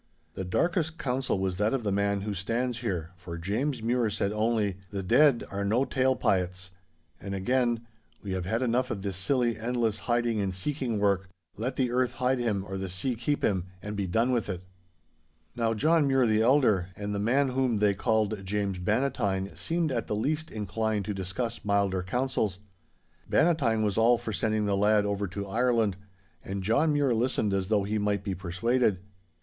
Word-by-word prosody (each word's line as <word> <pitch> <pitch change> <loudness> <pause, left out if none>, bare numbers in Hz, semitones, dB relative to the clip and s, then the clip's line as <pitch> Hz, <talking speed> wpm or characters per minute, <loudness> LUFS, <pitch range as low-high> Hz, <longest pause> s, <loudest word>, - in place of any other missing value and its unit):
'The 95 - -4
darkest 160 - 0
counsel 130 -3 -1
was 95 -1 -1
that 105 +5 +2
of 125 - -3
the 100 - 0
man 100 0 +1
who 105 +1 -3
stands 115 +5 -2
here, 90 -8 -3
for 90 -1 -7
James 110 - -2
Mure 120 -1 +1
said 100 -1 -1
only, 105 -3 0
"The 100 -1 -4
dead 135 +6 +4
are 100 0 -2
no 115 +7 +2
tale 130 -1 +2
pyets." 90 -2 -1 0.5
And 100 +1 -5
again, 120 +3 +1 0.4
"We 100 - -5
have 95 -1 -2
had 115 +5 0
enough 125 +1 +1
of 100 -5 -4
this 100 -2 -3
silly, 120 +4 +1
endless, 115 -2 0
hiding 120 -2 +1
and 95 -2 -2
seeking 130 +2 -2
work. 100 -2 +1 0.3
Let 125 +5 -3
the 125 -2 0
earth 125 0 +1
hide 125 +1 0
him, 105 -5 -1
or 95 +1 -4
the 95 -1 -4
sea 95 +9 -1
keep 145 +5 -2
him—and 95 +2 -2
be 100 -2 -2
done 115 +8 +2
with 120 -4 0
it!" 90 -1 -4 0.9
'Now 115 -1 0
John 155 +5 +3
Mure 135 -2 +3
the 110 -1 +3
elder, 110 -8 +3
and 105 0 -4
the 100 - -1
man 130 +6 +2
whom 130 -3 +1
they 105 -1 +3
called 110 -1 0
James 100 -1 -2
Bannatyne, 105 -2 0
seemed 165 -2 -1
at 115 -3 -2
the 105 - -1
least 155 +8 -1
inclined 110 0 -2
to 105 - -2
discuss 100 +5 -4
milder 100 -2 +1
councils. 110 -1 -1 0.7
Bannatyne 135 -10 +3
was 105 0 +1
all 120 +2 +5
for 110 - -5
sending 110 0 0
the 100 -1 +1
lad 105 +1 +3
over 100 0 -1
to 100 +2 -5
Ireland. 115 -1 +1 0.5
And 95 0 -4
John 140 +10 +3
Mure 145 -4 +2
listened 115 -3 0
as 95 -1 0
though 105 -1 +2
he 105 +2 -1
might 100 -1 0
be 100 -2 -2
persuaded. 100 +5 +1
110 Hz, 190 wpm, -28 LUFS, 100-125 Hz, 0.9 s, all